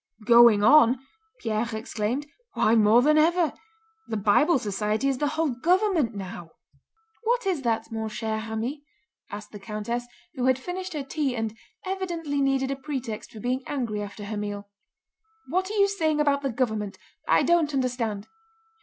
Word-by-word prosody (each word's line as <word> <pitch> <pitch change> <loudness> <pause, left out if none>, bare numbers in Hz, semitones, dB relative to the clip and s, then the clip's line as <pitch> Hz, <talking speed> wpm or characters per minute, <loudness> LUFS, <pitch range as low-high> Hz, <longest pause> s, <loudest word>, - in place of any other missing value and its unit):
"Going 235 -2 +7
on?" 255 0 +6 0.4
Pierre 220 0 -1
exclaimed. 220 +5 -2 0.3
"Why 220 - +3
more 225 +2 +5
than 305 +2 +5
ever! 335 0 +3 0.5
The 220 - -2
Bible 220 - +4
Society 210 +2 -1
is 270 -2 0
the 295 - +1
whole 320 -1 +2
government 330 - +1
now!" 180 -4 -7 0.7
"What 475 0 +1
is 365 -7 0
that, 225 -2 -1
mon 220 -1 -3
cher 220 0 -3
ami?" 225 +6 -4 0.5
asked 210 +1 -8
the 205 - -9
countess, 225 +3 -4 0.3
who 255 -5 -2
had 260 -1 +4
finished 365 +6 -5
her 295 -2 -3
tea 275 -1 -2
and 225 -1 -3 0.3
evidently 340 -7 -2
needed 270 -1 +1
a - - -1
pretext 265 -5 -5
for 220 - -11
being 255 +3 -1
angry 235 -7 -2
after 205 0 -7
her 210 +1 -4
meal. 205 -1 -5 0.8
"What 370 +5 0
are 430 - -3
you 400 0 +5
saying 315 -6 0
about 285 -1 +2
the 275 - -1
government? 220 -5 -2 0.3
I - - +4
don't 340 -3 +3
understand." 245 -6 -2
250 Hz, 165 wpm, -26 LUFS, 220-300 Hz, 0.8 s, Going